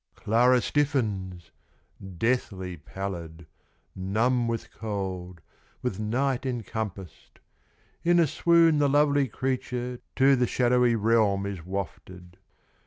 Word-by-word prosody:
Clara 125 Hz, +3 st, +3 dB
stiffens! 105 Hz, -, -1 dB, 0.7 s
deathly 95 Hz, -5 st, -1 dB
pallid, 85 Hz, 0 st, -7 dB, 0.5 s
Numb 115 Hz, +6 st, 0 dB
with 115 Hz, -1 st, -4 dB
cold, 95 Hz, -5 st, -5 dB, 0.4 s
with 110 Hz, -6 st, -2 dB
night 125 Hz, +4 st, 0 dB
encompassed. 110 Hz, -, -5 dB, 0.7 s
In 175 Hz, 0 st, +4 dB
a 170 Hz, -, +5 dB
swoon 165 Hz, +1 st, +4 dB
the 145 Hz, -1 st, +3 dB
lovely 145 Hz, -1 st, +3 dB
creature 125 Hz, 0 st, -3 dB, 0.2 s
To 135 Hz, +1 st, +5 dB
the 125 Hz, -1 st, +1 dB
shadowy 125 Hz, -1 st, +2 dB
realm 105 Hz, -3 st, +2 dB
is 100 Hz, -4 st, -5 dB
wafted. 90 Hz, -1 st, -7 dB
115 Hz, 105 wpm, -27 LUFS, 95-130 Hz, 0.7 s, a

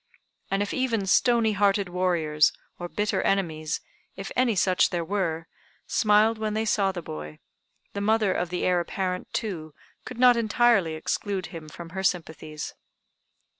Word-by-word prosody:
And 195 Hz, +1 st, +1 dB
if 205 Hz, -, -4 dB
even 235 Hz, -6 st, 0 dB
stony 230 Hz, +3 st, +3 dB
hearted 200 Hz, -1 st, +2 dB
warriors, 170 Hz, -4 st, +2 dB, 0.3 s
or 175 Hz, 0 st, -5 dB
bitter 210 Hz, +3 st, -1 dB
enemies, 160 Hz, -6 st, -1 dB, 0.3 s
if 195 Hz, 0 st, -7 dB
any 245 Hz, -3 st, +2 dB
such 185 Hz, 0 st, +3 dB
there 170 Hz, -2 st, -2 dB
were, 165 Hz, -4 st, -2 dB, 0.4 s
smiled 215 Hz, +1 st, +3 dB
when 215 Hz, -1 st, -2 dB
they 220 Hz, +1 st, 0 dB
saw 200 Hz, -3 st, +2 dB
the 175 Hz, -3 st, -6 dB
boy, 75 Hz, -, -7 dB, 0.6 s
the 200 Hz, -, -3 dB
mother 215 Hz, -2 st, +2 dB
of 180 Hz, -, -2 dB
the 180 Hz, +1 st, -3 dB
heir 180 Hz, -1 st, +3 dB
apparent, 180 Hz, +1 st, -3 dB
too, 160 Hz, -9 st, -4 dB, 0.3 s
could 250 Hz, -, -8 dB
not 250 Hz, 0 st, +6 dB
entirely 220 Hz, -6 st, +3 dB
exclude 190 Hz, +4 st, -2 dB
him 160 Hz, -2 st, -8 dB
from 170 Hz, +2 st, -10 dB
her 190 Hz, +3 st, -5 dB
sympathies. 160 Hz, -4 st, -3 dB
190 Hz, 155 wpm, -26 LUFS, 170-215 Hz, 0.6 s, not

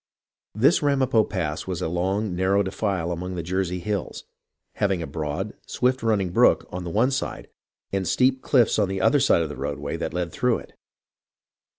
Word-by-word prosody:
This 135 Hz, -, +4 dB
Ramapo 135 Hz, -6 st, +3 dB
Pass 80 Hz, -7 st, -3 dB
was 90 Hz, -3 st, -3 dB
a 90 Hz, -, -1 dB
long, 95 Hz, +3 st, -1 dB
narrow 95 Hz, +2 st, +2 dB
defile 95 Hz, -3 st, -2 dB
among 90 Hz, +2 st, -4 dB
the 85 Hz, -, -3 dB
Jersey 90 Hz, +1 st, -1 dB
hills, 100 Hz, +1 st, -4 dB, 0.5 s
having 95 Hz, -4 st, +1 dB
a -, -, -3 dB
broad, 80 Hz, +7 st, -4 dB
swift 130 Hz, +1 st, 0 dB
running 105 Hz, -5 st, +1 dB
brook -, -, +4 dB
on 90 Hz, -1 st, -5 dB
one 115 Hz, +7 st, +2 dB
side 135 Hz, -, -4 dB, 0.4 s
and 95 Hz, -2 st, -1 dB
steep 130 Hz, +7 st, +2 dB
cliffs 120 Hz, -5 st, +3 dB
on 100 Hz, -3 st, +2 dB
the 95 Hz, 0 st, -2 dB
other 145 Hz, -, +4 dB
side 85 Hz, -, +3 dB
of 80 Hz, -, -4 dB
the 75 Hz, -, -6 dB
roadway -, -, -4 dB
that -, -, -3 dB
led 90 Hz, -1 st, -3 dB
through 125 Hz, +5 st, +1 dB
it. -, -, -13 dB
95 Hz, 180 wpm, -24 LUFS, 90-110 Hz, 0.5 s, This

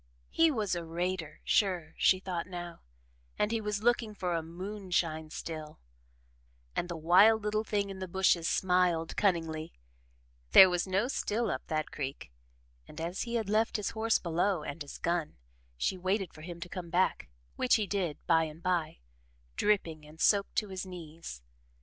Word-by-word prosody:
He 330 Hz, 0 st, +4 dB
was 215 Hz, -10 st, -1 dB
a 175 Hz, -1 st, -2 dB
"raider" 165 Hz, -1 st, -3 dB
sure, 180 Hz, -6 st, +1 dB
she 185 Hz, -, +4 dB
thought 180 Hz, -3 st, -4 dB
now, 175 Hz, -2 st, -7 dB, 0.6 s
and 210 Hz, -, +1 dB
he 225 Hz, -1 st, 0 dB
was 210 Hz, 0 st, -2 dB
looking 235 Hz, -3 st, +2 dB
for 180 Hz, -3 st, -2 dB
a 165 Hz, -, 0 dB
"moonshine" 175 Hz, -2 st, -3 dB
still, 155 Hz, -1 st, -7 dB, 1.0 s
and 175 Hz, -, -1 dB
the 170 Hz, -, -4 dB
wild 195 Hz, +7 st, +5 dB
little 215 Hz, +1 st, 0 dB
thing 205 Hz, -2 st, -1 dB
in 190 Hz, -, -8 dB
the 185 Hz, -, -4 dB
bushes 175 Hz, -2 st, +2 dB
smiled 180 Hz, -3 st, +2 dB
cunningly 165 Hz, -5 st, 0 dB, 0.8 s
there 190 Hz, -1 st, +10 dB
was 180 Hz, +1 st, 0 dB
no 195 Hz, +5 st, +1 dB
still 235 Hz, -3 st, -1 dB
up -, -, -5 dB
that 155 Hz, -2 st, -2 dB
creek 135 Hz, -, -5 dB, 0.6 s
and 150 Hz, -, -10 dB
as 170 Hz, +3 st, -3 dB
he 235 Hz, 0 st, -3 dB
had 225 Hz, -3 st, -1 dB
left 215 Hz, +2 st, +2 dB
his 210 Hz, -, -2 dB
horse 225 Hz, 0 st, +2 dB
below 175 Hz, 0 st, 0 dB
and 145 Hz, +3 st, -6 dB
his 145 Hz, -, -7 dB
gun, 170 Hz, -2 st, -1 dB, 0.4 s
she 185 Hz, -, -1 dB
waited 190 Hz, 0 st, -1 dB
for 155 Hz, -, -12 dB
him 170 Hz, +1 st, -8 dB
to 175 Hz, -, -5 dB
come 175 Hz, -1 st, -7 dB
back, 180 Hz, -, +1 dB, 0.3 s
which 255 Hz, -, +3 dB
he 215 Hz, -3 st, +1 dB
did, 190 Hz, -6 st, -2 dB
by 165 Hz, -1 st, +4 dB
and 155 Hz, +1 st, -10 dB
by, 175 Hz, -, -1 dB, 0.5 s
dripping 170 Hz, -7 st, +1 dB
and 150 Hz, +1 st, -15 dB
soaked 200 Hz, +2 st, +3 dB
to 210 Hz, -, 0 dB
his 190 Hz, -1 st, -4 dB
knees. 165 Hz, -, -9 dB
180 Hz, 175 wpm, -31 LUFS, 165-205 Hz, 1.0 s, there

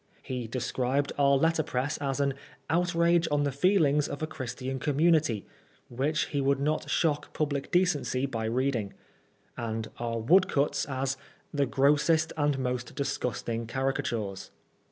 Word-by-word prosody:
He 125 Hz, -3 st, -4 dB
described 130 Hz, +3 st, -1 dB
our 140 Hz, 0 st, +5 dB
letterpress 150 Hz, -3 st, 0 dB
as 135 Hz, -1 st, -2 dB
an 140 Hz, -1 st, +2 dB, 0.4 s
"outrage 170 Hz, 0 st, +3 dB
on 145 Hz, 0 st, +2 dB
the 140 Hz, -, 0 dB
feelings 150 Hz, -2 st, +3 dB
of 145 Hz, -, -5 dB
a -, -, +2 dB
Christian 130 Hz, -3 st, -5 dB
community," 150 Hz, -, +2 dB, 0.4 s
which 140 Hz, +5 st, 0 dB
he 145 Hz, -, -1 dB
would 140 Hz, 0 st, +2 dB
not 150 Hz, +2 st, -1 dB
shock 150 Hz, -3 st, 0 dB
public 145 Hz, -2 st, -2 dB
decency 175 Hz, -7 st, +1 dB
by 115 Hz, -5 st, -3 dB
reading; 120 Hz, -3 st, -1 dB, 0.6 s
and 110 Hz, -1 st, -3 dB
our 115 Hz, -1 st, -2 dB
woodcuts 140 Hz, +3 st, +3 dB
as 135 Hz, -1 st, -2 dB, 0.2 s
" -, -, -36 dB
the 140 Hz, -2 st, +1 dB
grossest 150 Hz, +4 st, +3 dB
and 145 Hz, -2 st, +1 dB
most 125 Hz, -1 st, -3 dB
disgusting 115 Hz, -4 st, -2 dB
caricatures." 120 Hz, -6 st, -2 dB
140 Hz, 135 wpm, -28 LUFS, 125-150 Hz, 0.6 s, our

